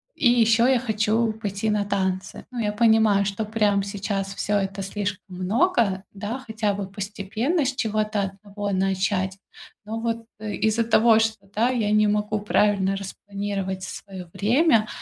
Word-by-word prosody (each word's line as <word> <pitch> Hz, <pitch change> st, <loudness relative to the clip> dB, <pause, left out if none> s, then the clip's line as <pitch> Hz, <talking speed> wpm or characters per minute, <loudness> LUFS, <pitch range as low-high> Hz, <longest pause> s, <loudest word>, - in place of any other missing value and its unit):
и 245 Hz, -, +3 dB
ещё 230 Hz, 0 st, +4 dB
я 260 Hz, -2 st, +4 dB
хочу 220 Hz, -1 st, +1 dB
пойти 215 Hz, -1 st, -3 dB
на 210 Hz, -1 st, +1 dB
танцы. 190 Hz, -2 st, -2 dB
Ну, 245 Hz, -, -5 dB
я 210 Hz, -2 st, 0 dB
понимаю, 220 Hz, -2 st, +4 dB
что, 200 Hz, +2 st, -2 dB
прям 210 Hz, -2 st, +1 dB
сейчас 200 Hz, -1 st, -3 dB
всё 205 Hz, 0 st, 0 dB
это 195 Hz, 0 st, -2 dB
слишком 195 Hz, -1 st, -4 dB
много, 200 Hz, -, +1 dB
да, 210 Hz, +6 st, -4 dB
хотя 215 Hz, -2 st, 0 dB
бы 195 Hz, -1 st, -4 dB
постепенно 210 Hz, -, -2 dB
с 265 Hz, -, 0 dB
чего-то 215 Hz, -2 st, 0 dB
одного 200 Hz, +1 st, -5 dB
начать. 190 Hz, 0 st, 0 dB, 0.5 s
Но 225 Hz, +1 st, -4 dB
вот, 230 Hz, 0 st, -2 dB
э, 215 Hz, -1 st, -4 dB
из-за 220 Hz, +1 st, +1 dB
того, 225 Hz, 0 st, +5 dB
что, 220 Hz, -2 st, -1 dB
да, 230 Hz, +4 st, +2 dB
я 225 Hz, -5 st, 0 dB
не 215 Hz, 0 st, +4 dB
могу 210 Hz, 0 st, 0 dB
правильно 200 Hz, -2 st, +2 dB
распланировать 195 Hz, -1 st, -4 dB
своё 185 Hz, -1 st, -8 dB
время, 230 Hz, +1 st, +3 dB
210 Hz, 155 wpm, -24 LUFS, 195-225 Hz, 0.5 s, того